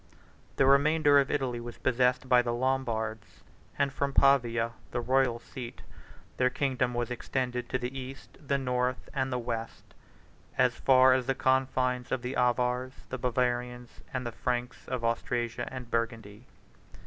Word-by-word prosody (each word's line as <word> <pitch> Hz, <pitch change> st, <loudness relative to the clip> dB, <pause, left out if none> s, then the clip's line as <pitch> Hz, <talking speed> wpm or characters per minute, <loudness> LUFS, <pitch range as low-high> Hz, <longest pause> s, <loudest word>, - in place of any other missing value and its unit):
The 135 Hz, -, +3 dB
remainder 145 Hz, +1 st, +5 dB
of 135 Hz, -, +1 dB
Italy 130 Hz, -4 st, -1 dB
was 120 Hz, 0 st, -8 dB
possessed 125 Hz, 0 st, +1 dB
by 125 Hz, -1 st, +6 dB
the 120 Hz, -1 st, -2 dB
Lombards; 115 Hz, -5 st, -2 dB, 0.3 s
and 140 Hz, -1 st, +1 dB
from 140 Hz, 0 st, -1 dB
Pavia, 120 Hz, -4 st, +3 dB, 0.2 s
the -, -, -2 dB
royal 125 Hz, 0 st, +2 dB
seat, 120 Hz, 0 st, -9 dB, 0.5 s
their 125 Hz, 0 st, +3 dB
kingdom 125 Hz, -2 st, -1 dB
was 120 Hz, 0 st, -2 dB
extended 125 Hz, 0 st, -3 dB
to 130 Hz, -, 0 dB
the 125 Hz, +1 st, -5 dB
east, 135 Hz, 0 st, -8 dB
the 140 Hz, -, +2 dB
north, 125 Hz, -3 st, -1 dB
and 130 Hz, -1 st, -1 dB
the 125 Hz, -, 0 dB
west, 115 Hz, -2 st, -5 dB, 0.6 s
as 125 Hz, -1 st, +4 dB
far 130 Hz, +1 st, +5 dB
as 130 Hz, -1 st, 0 dB
the 135 Hz, -, +1 dB
confines 130 Hz, -1 st, +1 dB
of 130 Hz, -2 st, -1 dB
the 125 Hz, +2 st, -3 dB
Avars, 125 Hz, +1 st, +1 dB, 0.2 s
the 130 Hz, -, -4 dB
Bavarians, 125 Hz, -1 st, -2 dB
and 130 Hz, -1 st, -3 dB
the 120 Hz, -, -3 dB
Franks 125 Hz, +1 st, -3 dB
of 125 Hz, -2 st, -3 dB
Austrasia 120 Hz, 0 st, -1 dB
and 125 Hz, -2 st, -8 dB
Burgundy. 115 Hz, -1 st, -3 dB
125 Hz, 155 wpm, -29 LUFS, 120-130 Hz, 0.6 s, by